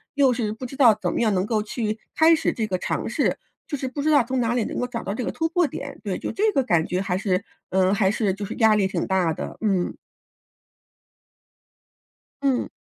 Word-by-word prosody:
又 275 -3 +4
是 230 -3 -2
不 225 +4 -6
知 255 - -8
道 255 -5 +6
怎 - - -1
么 - - -1
样 215 -3 +2
能 185 +1 +1
够 215 -1 0
去 215 0 -3 0.2
开 320 +1 +6
始 - - 0
这 220 -2 -2
个 185 -3 -1
尝 - - -2
试， - - 0 0.3
就 290 - -4
是 260 -1 -3
不 285 +3 -4
知 310 - +1
道 285 -5 +5
从 255 +1 -1
哪 235 0 +1
里 240 -3 0
能 - - -5
够 245 - -1
找 235 -2 -5
到 200 - -3
这 240 +3 -3
个 - - -2
突 325 - -1
破 350 +1 +2
点？ - - -6
对， - - -2
就 - - -4
这 430 +2 +2
个 270 - +2
感 170 -9 +2
觉 180 +1 -1
还 185 -2 -1
是 190 -1 0 0.3
嗯， 190 +1 +2
还 195 -1 +3
是 210 -3 0
就 200 - -6
是 215 - -6
压 220 -2 +5
力 200 -2 +2
挺 - - -2
大 185 -4 +2
的， - - -6
嗯。 195 -5 0 2.5
嗯。 270 -3 +1
220 Hz, 255 characters per minute, -24 LUFS, 195-260 Hz, 2.5 s, 道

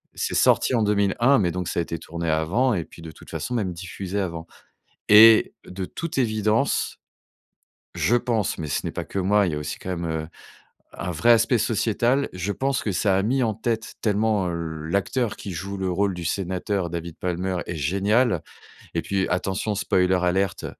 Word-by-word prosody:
c'est - - -2
sorti 130 - +3
en 110 - +2
2001 105 +6 +3
mais 90 -4 +1
donc 90 -1 -3
ça - - -1
a - - +1
été 85 - -5
tourné 85 0 -4
avant 95 +12 +1
et 85 -4 -1
puis 85 - -15
de 80 -1 -8
toute - - -16
façon 125 - -4
même 100 -6 -1
diffusé 95 +3 -5
avant 85 -3 -4 0.6
et 110 +1 +8
de 95 +1 -5
toute 165 - -6
évidence, 110 -2 +1 1.0
je 120 - +2
pense, 115 -4 0
mais 75 -2 -4
ce - - -2
n'est - - -3
pas - - -4
que 100 - -5
moi, 100 +1 +3
il 85 - -2
y - - -2
a - - -2
aussi 75 0 -5
quand 95 - -6
même, 85 0 -4
heu, 80 -1 -3 0.7
un 90 - -4
vrai 115 +9 +4
aspect 115 +1 +3
sociétal. 115 +5 +1
Je 90 +3 -3
pense 135 +2 -1
que 105 - -1
ça 95 +1 +2
a 95 - +2
mis 130 +5 +1
en 110 -2 +1
tête 115 0 -3
tellement 105 -3 +1
l'acteur 85 - -2
qui 100 - -7
joue 100 +4 -5
le 95 -1 -2
rôle 100 +1 0
du 85 -1 -6
sénateur 95 +1 -2
David 85 -1 -6
Palmer 90 +1 -2
est 85 - -4
génial 100 - +1 0.5
et - - +1
puis 95 -1 -1
attention 95 +3 -1
spoiler 95 -1 +2
alert 95 +2 0
95 Hz, 195 wpm, -24 LUFS, 85-110 Hz, 1.0 s, et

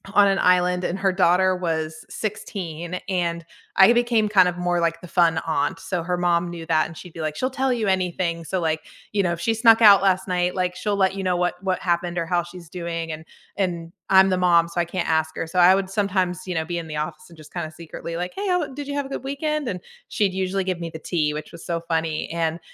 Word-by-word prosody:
on 205 -1 +7
an 195 0 +2
island, 180 0 +3
and 185 +3 -2
her 195 -2 +2
daughter 185 0 +3
was 160 -3 -3
16 180 -5 -5
and 170 -3 -1 0.3
I 195 +5 +8
became 235 -3 +2
kind 185 -3 +5
of 175 - -6
more 175 -1 0
like 165 0 0
the 180 - -11
fun 165 -2 +3
aunt. 160 +1 0
So, 180 -3 -3
her 180 +1 -1
mom 175 -1 +1
knew 170 -1 -7
that 155 -1 +2
and 165 - -12
she'd 180 -3 -11
be 165 - -7
like, 155 -1 -3
"She'll 255 - 0
tell 265 0 0
you 225 -4 0
anything. 180 -3 0
So, 185 +3 -2
like, 160 -1 0 0.3
you 200 -2 +2
know, 175 - +1
if 170 - -3
she 225 +6 +1
snuck 225 0 +5
out 200 -3 +8
last 190 -1 +2
night, 180 0 0
like, 180 -1 -1
she'll 205 0 -1
let 190 0 +2
you 195 - -4
know 180 -1 +1
what 180 0 +1
what 185 -1 0
happened 175 0 -1
or 170 - 0
how 175 0 0
she's 175 -1 -11
doing, 165 -2 -4
and 155 +1 -8 0.3
and 175 -3 -2 0.2
I'm 190 0 +7
the 185 - +1
mom, 170 -2 +4
so 175 +1 -1
I - - -1
can't 175 +1 -3
ask 160 -1 +1
her." 165 - -3
So, 180 +3 -6
I 180 +2 +8
would 190 -1 0
sometimes, 185 -2 -1
you 180 - -2
know, 160 0 -1
be 175 +1 -3
in 165 -1 -5
the 150 - -5
office 155 +1 -5
and 165 - -16
just 155 -1 -15
kinda 165 -3 -4
secretly 165 +1 -7
like, 180 +1 -4
"Hey, 400 +1 -3
how 355 -5 +1
did 285 +1 -7
you 285 - -3
have 285 -1 -1
a - - -9
good 270 - -5
weekend?" 295 0 -2
And 180 -3 -4 0.3
she'd 200 -3 0
usually 190 0 -1
give 180 -2 -2
me 165 - -4
the 160 -1 -8
tea, 155 -4 -1
which 155 +3 -7
was 170 - -11
so 170 -1 -1
funny, 160 -2 -1
and 165 0 -1
180 Hz, 260 wpm, -23 LUFS, 165-190 Hz, 0.3 s, I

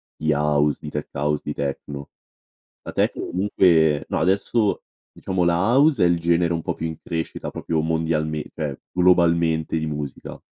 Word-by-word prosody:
di 75 0 0
house, 75 0 +1
di 75 - -6
tech-house, 75 0 -2
di 75 - -3
techno. 70 0 -5 0.7
La - - -6
techno - - 0
comunque 85 -5 +3
no, - - -1
adesso, 100 +5 +1 0.3
diciamo 95 -1 -2
la 85 -1 +3 0.2
house 140 - +4
è 90 - +6
il 85 -1 +2
genere 85 0 +2
un 80 - -2
po' - - -2
più 80 - -5
in 80 - -6
crescita, 80 -1 -4
proprio 80 -1 -2
mondialmen 80 -1 -1
cioè, 75 -3 -4
globalmente 85 -3 +3
di 80 - -2
musica, 75 -2 -6
80 Hz, 160 wpm, -23 LUFS, 75-85 Hz, 0.7 s, è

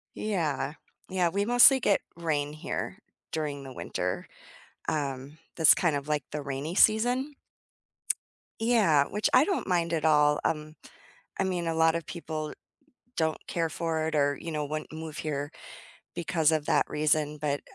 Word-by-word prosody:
Yeah, 160 -9 -1 0.4
yeah, 185 -2 +2
we 200 +4 0
mostly 245 +3 +7
get 200 - +3 0.2
rain 150 -3 -1
here 155 - -5 0.3
during 145 -3 -3
the 130 - -9
winter, - - -3 0.6
um, 140 -1 -3 0.2
that's 160 -4 +7
kind 170 -4 +1
of 140 +1 -4
like 150 -1 0
the 150 - -3
rainy 140 +4 -4
season. 245 +8 +3 1.3
Yeah, 205 -12 +4
which 210 +2 0
I 255 - +7
don't 380 +3 -1
mind 170 -2 +1
at 160 -1 0
all, 150 -1 +4
um, 155 0 -2 0.6
I 195 - +2
mean, 180 -2 -1
a 165 - 0
lot 160 0 +4
of 170 - -2
people 155 -3 -5 0.6
don't 160 -1 +1
care 165 -1 -1
for 160 -1 -2
it 160 - -2
or, 145 -1 +2
you 165 - -5
know, 150 -2 -2
wouldn't 155 +2 -5
move 160 -1 -7
here 145 -2 -3 0.6
because 165 -2 +1
of 155 -2 0
that - - +3
reason, 150 0 +1
but 145 -1 -1
155 Hz, 160 wpm, -28 LUFS, 150-175 Hz, 1.3 s, mostly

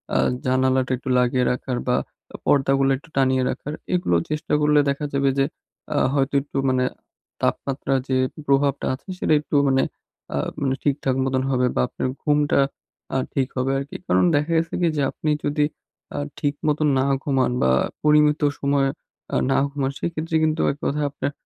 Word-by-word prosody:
আ - - +4 0.3
জানালাটা 130 0 +2
একটু 130 - -7
লাগিয়ে 125 0 +2
রাখার 125 0 -3
বা, 125 - +3 0.5
পর্দাগুলো 135 -1 +3
একটু 145 - -18
টানিয়ে 130 -1 +3
রাখার 150 - -4 0.2
এগুলো 175 - +2
চেষ্টা 155 +1 -3
করলে 150 0 +4
দেখা 140 +2 -1
যাবে 140 0 +2
যে, 135 - +3 0.5
আ - - +1 0.2
হয়তো 140 -1 +1
একটু 145 0 -7
মানে 130 0 +2 0.6
তাপমাত্রার 135 -1 0
যে, 130 - 0 0.3
প্রভাবটা 140 0 +2
আছে 130 - -9
সেটা 155 - +1
একটু 150 - -4
মানে 135 -1 +3 0.5
আ - - 0 0.2
মানে 135 -1 +1
ঠিকঠাক 140 -2 0
মতন 130 0 0
হবে 125 -1 +2
বা, - - +2
আপনার - - -3 0.2
ঘুমটা 145 -1 +2 0.6
আ - - +3 0.2
ঠিক 135 -2 +1
হবে 130 +1 +1
আরকি। 140 +1 -7
কারণ - - +3
দেখা 150 +3 0
গেছে 165 0 -1
কি 170 - +3
যে, - - +2
আপনি 155 - -3 0.2
যদি 145 0 +2 0.5
আ - - -3 0.2
ঠিক 145 -1 0
মতো 150 0 +1
না 130 - +2 0.2
ঘুমান 135 -3 +1
বা 65 - +4 0.3
পরিমিত 150 0 +4 0.2
সময়ে 140 -1 +2 0.4
আ - - +1 0.2
না - - +3
ঘুমান 140 -1 -2
সেক্ষেত্রে 165 -1 -3
কিন্তু 155 0 +1
এক 140 - -8
কথা 150 +2 0
আপনার 140 0 -3
140 Hz, 175 wpm, -23 LUFS, 130-150 Hz, 0.6 s, আ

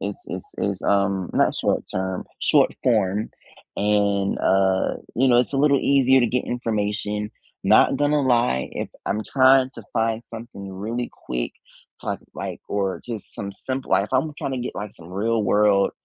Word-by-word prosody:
it's 100 0 -3
it's 90 0 -6
it's, 100 -2 -2
um 100 -2 +1
not - - +3
short-term, 95 0 -2 0.2
short-form, 105 -3 +2 0.5
and, 100 -1 +1
uh, 95 0 +2 0.2
you 130 +3 +3
know, 120 -1 +5
it's 125 - +1
a - - 0
little 140 0 +4
easier 135 -1 +4
to 120 - +3
get 125 +2 -1
information. 105 -3 -2 0.3
Not - - +5
gonna 145 0 +2
lie, 120 - +2
if - - -4 0.2
I'm 105 - 0
trying 130 -1 +4
to 115 - -9
find 115 0 0
something 110 -4 -8
really 115 +6 -4 0.2
quick, - - -2 0.5
it's - - -3
like - - -5
or 100 -2 -1
just 115 -4 -7
some 100 0 -5
simple 130 +6 -5
like, 100 - +4
if 105 - -11
I'm 150 +4 +1
tryna 130 -2 -2
get, 125 - -5
like, 105 -1 -5
some 85 +1 -13
real-world, 105 -1 +2
105 Hz, 160 wpm, -23 LUFS, 100-125 Hz, 0.5 s, know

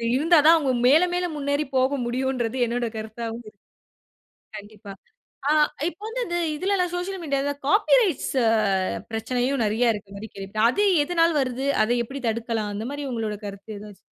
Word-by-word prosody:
இருந்தா 325 +5 +4
தான் 330 - +8
அவுங்க 275 -4 0
மேல, 295 +6 +6
மேல 360 0 0
முன்னேறி 285 +1 0
போக 260 +2 +2
முடியும்ன்றது 250 0 -2
என்னுடைய 240 0 -2
கருத்தாவும் 225 +2 -6
இருக்கு. 200 - -29 1.0
கண்டிப்பா! 205 -1 -11 0.6
ஆ. - - +3 0.4
இப்ப 345 +3 -10
வந்து 455 +3 -5
இது 345 0 -1 0.2
இதுலலாம் 365 0 0
சோசியல் 360 +1 -4
மீடியாலலாம் 285 -1 -2
காப்பி 410 +9 +2
ரைட்ஸ் 380 - 0
அ - - +4 0.6
பிரச்சனையும் 245 +4 -1
நிறைய 225 +2 +2
இருக்கிறமாரி 205 +1 -8
கேள்விப்பட்டேன். 200 +3 0
அது 410 +9 +1 0.2
எதனால் 335 0 +2
வருது? 260 0 -2 0.2
அத 220 - -4
எப்பிடி 270 +3 -8
தடுக்கலாம்? 225 -2 -2
அந்தமாரி 275 +8 -5
உங்களோட 220 -3 -3
கருத்து 200 +2 -9
எதாவது? 205 -1 -11
255 Hz, 155 wpm, -24 LUFS, 220-300 Hz, 1.0 s, தான்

